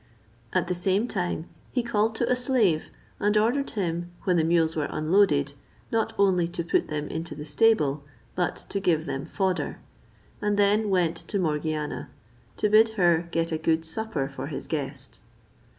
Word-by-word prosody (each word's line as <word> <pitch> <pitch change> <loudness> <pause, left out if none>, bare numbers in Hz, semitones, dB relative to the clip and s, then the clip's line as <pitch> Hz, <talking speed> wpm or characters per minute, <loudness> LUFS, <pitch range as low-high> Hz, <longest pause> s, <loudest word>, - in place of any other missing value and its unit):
At - - +1
the 180 - 0
same 190 +5 +1
time 180 -6 -2 0.2
he 245 - 0
called 220 -1 +1
to 235 +1 0
a - - +4
slave, 240 - +1 0.3
and 210 +1 +2
ordered 245 +6 +2
him, 175 -3 -2
when 180 - +2
the 165 - +3
mules 165 -1 +2
were 150 -2 0
unloaded, 155 -4 +2 0.4
not 225 -1 +1
only 185 -4 +3
to 170 0 -4
put 165 - +1
them 150 -1 -3
into 165 +1 -5
the 150 0 -7
stable, 150 -7 +2 0.3
but 180 -1 -2
to 200 - -1
give 165 -5 +1
them 135 +1 -4
fodder; 190 0 -1 0.6
and 210 -1 +1
then 205 +1 +3
went 175 -3 +2
to 205 - -2
Morgiana, 155 -3 -2 0.5
to - - +2
bid 215 +2 +6
her 170 -2 +3
get 165 0 -1
a 160 - -1
good 160 0 +1
supper 160 -5 -3
for 140 - -6
his - - -5
guest. - - -5
175 Hz, 170 wpm, -26 LUFS, 160-210 Hz, 0.6 s, bid